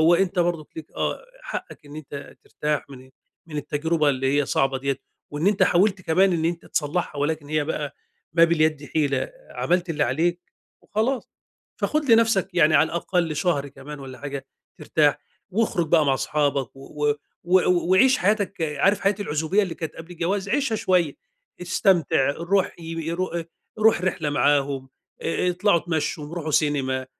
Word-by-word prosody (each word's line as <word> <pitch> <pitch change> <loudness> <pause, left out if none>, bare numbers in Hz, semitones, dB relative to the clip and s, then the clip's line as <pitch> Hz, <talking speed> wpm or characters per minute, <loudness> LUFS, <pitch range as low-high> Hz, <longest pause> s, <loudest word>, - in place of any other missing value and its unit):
هو 165 +2 +6
أنت 185 0 0
برضك 170 -3 0
ليك 160 -1 -9
آه، - - -2 0.2
حقّك 150 - -7
إن 145 +1 -10
أنت 140 -2 -9
ترتاح 150 -1 -2
من 130 -1 -12 0.4
من 155 -2 -7
التجربة 150 +2 0
اللي 135 +1 0
هي 145 - -1
صعبة 135 -1 +1
ديّة، 140 0 -2 0.3
وإن 150 +5 -2
أنت 205 -1 +2
حاولت 190 +1 +2
كمان 185 +4 +3
إن 160 - -1
أنت 170 0 -3
تصلّحها 150 0 -2
ولكن 150 0 -1
هي 155 0 0
بقى 160 - -3 0.4
ما 165 - +7
باليد 155 -3 +1
حِيلة، 150 - -1 0.2
عملت 180 0 0
اللي 150 -2 0
عليك 170 +8 0 0.4
وخلاص. 235 +5 -1 0.5
فخُد 300 -3 0
لنَفسك 220 -5 +3
يعني 155 -3 +4
على 160 - +6
الأقل 170 -1 -1
شهر 145 -6 0
كمان 140 +2 -10
والّا 130 -1 -9
حاجة 140 -1 -6 0.3
ترتاح، 150 -2 +2 0.3
واخرُج 195 -5 0
بقى 155 -2 +4
مع 135 - +3
اصحابك 140 -2 -1
و 150 +2 -1 0.3
و 185 +2 +5 0.3
وعيش 255 +7 +5
حياتك، 200 -2 0
عارف 160 +7 +2
حياة 195 +1 +2
العزوبية 160 +4 +1
اللي 180 -4 -3
كانت 160 -3 -6
قَبْل 165 +2 -10
الجواز؟ 190 +4 -2
عيشها 270 -4 +1
شوية. 180 -6 +1 0.5
استمتع، 170 -6 +2
روح 175 +5 0
ي - - -11 0.3
يرو 180 +3 -1
آآ 170 -1 -4 0.3
روح 215 -4 +4
رحلة 170 -5 -1
معاهم، 140 -2 +1 0.3
آآ 180 +2 0
اطلعوا 180 +1 +3
اتمشّوا 160 -1 -2
وروحوا 160 -1 -5
سينما، 135 -3 +1
160 Hz, 160 wpm, -24 LUFS, 145-185 Hz, 0.5 s, ما